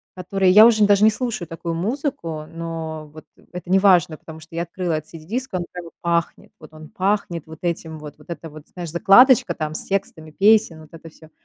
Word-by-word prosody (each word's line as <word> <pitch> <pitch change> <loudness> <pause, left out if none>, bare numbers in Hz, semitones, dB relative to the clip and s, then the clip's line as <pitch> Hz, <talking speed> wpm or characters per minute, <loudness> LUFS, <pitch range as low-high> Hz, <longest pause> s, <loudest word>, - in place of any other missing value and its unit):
которые 185 +1 +1
я 210 +4 +9
уже 220 -3 +5
даже 205 0 +3
не 220 - +6
слушаю 220 -6 -4
такую 165 +1 -5
музыку,- 175 - -4
но 160 -2 -7
вот 155 - -13 0.3
это 180 0 -9
неважно, 185 -4 +3
потому 160 +1 -12
что 160 +1 -14
я 170 - -1
открыла 175 0 -4
этот 155 +1 -5
CD-диск, 205 +12 -6
и - - 0
он 175 - -4
как 180 - -8
бы 165 - -12
пахнет, 170 -1 -2
вот 155 0 -15
он 155 0 -13
пахнет 185 -4 -2
вот 160 0 -12
этим 160 -2 -4
вот, 150 -1 -11
вот 150 - -20
это 165 -1 -7
вот, 155 0 -14
знаешь, 175 -2 -7
закладочка 195 - +5
там 155 -2 -4
с - - 0
текстами 160 -5 -4
песен, 205 -2 +3
вот 155 - -16
это 165 0 -12
всё, 160 0 -18
170 Hz, 215 wpm, -21 LUFS, 160-195 Hz, 0.3 s, я